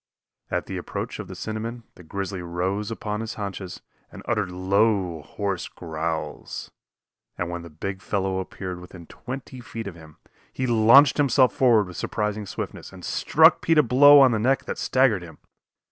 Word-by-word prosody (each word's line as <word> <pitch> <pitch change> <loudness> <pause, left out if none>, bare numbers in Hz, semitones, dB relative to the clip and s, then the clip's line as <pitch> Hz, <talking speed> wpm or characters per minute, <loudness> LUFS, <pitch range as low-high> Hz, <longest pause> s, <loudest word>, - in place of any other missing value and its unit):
At - - -2
the - - -5
approach - - -5
of - - -6
the - - -8
cinnamon 115 +2 -5
the - - -15
grizzly 95 +2 -5
rose 90 +4 -2
upon 105 -1 -4
his 115 0 -5
haunches 100 -3 -6 0.3
and - - -11
uttered 105 -5 0
low, 95 -2 +1
hoarse 95 +4 -4
growls, 80 0 -5 0.7
and 90 0 -3
when 85 0 -4
the 85 - -10
big 95 +5 -6
fellow 95 -2 -1
appeared 95 -1 -6
within 90 -1 -12
twenty 130 +6 -8
feet 115 -1 -7
of 100 - -6
him, 80 -2 -15 0.3
he 130 - -3
launched 120 +4 +6
himself 135 -3 +4
forward 115 -5 +4
with 90 -2 -10
surprising 105 0 -2
swiftness - - -6
and - - -11
struck - - +4
Pete 165 -1 +2
a 150 - +7
blow 140 +4 +7
on 130 -2 +6
the 110 - 0
neck 130 +5 +1
that - - -5
staggered 130 -7 +2
him. 80 -3 -11
100 Hz, 175 wpm, -24 LUFS, 90-115 Hz, 0.7 s, a